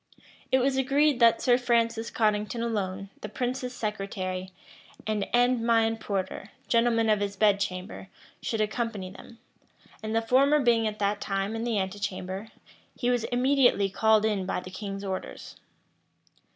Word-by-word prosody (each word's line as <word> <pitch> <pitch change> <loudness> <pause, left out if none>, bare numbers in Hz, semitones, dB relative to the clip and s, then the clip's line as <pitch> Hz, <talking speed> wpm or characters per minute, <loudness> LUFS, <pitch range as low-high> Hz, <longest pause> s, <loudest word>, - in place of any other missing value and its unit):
It 260 - +5
was 265 +1 +1
agreed 275 +1 +2
that 230 -1 +5
Sir 245 -1 +4
Francis 230 -2 +1
Cottington 215 +1 0
alone, 195 -4 -3
the 210 - -6
prince's 250 +3 -3
secretary, 190 -3 -4 0.6
and 215 -2 -1
Endymion 230 -2 +3
Porter, 195 -1 -4 0.2
gentleman 230 -1 +2
of 215 -1 +3
his 200 0 -2
bed 205 -1 +3
chamber, 185 0 -4 0.3
should 225 -2 -2
accompany 215 -3 -2
them; 230 +4 -13 0.6
and 220 +1 -3
the 225 - +3
former 275 +5 +4
being 235 -4 +3
at 210 0 -4
that 205 0 -1
time 195 +2 -2
in 225 - -3
the 235 -3 0
antechamber, 190 0 -4 0.5
he 245 -1 +1
was 245 -2 0
immediately 245 -5 +3
called 220 +1 +3
in 200 -4 0
by - - -1
the 185 0 -10
king's 195 +1 -6
orders. 190 -1 -6
220 Hz, 150 wpm, -27 LUFS, 200-240 Hz, 0.6 s, It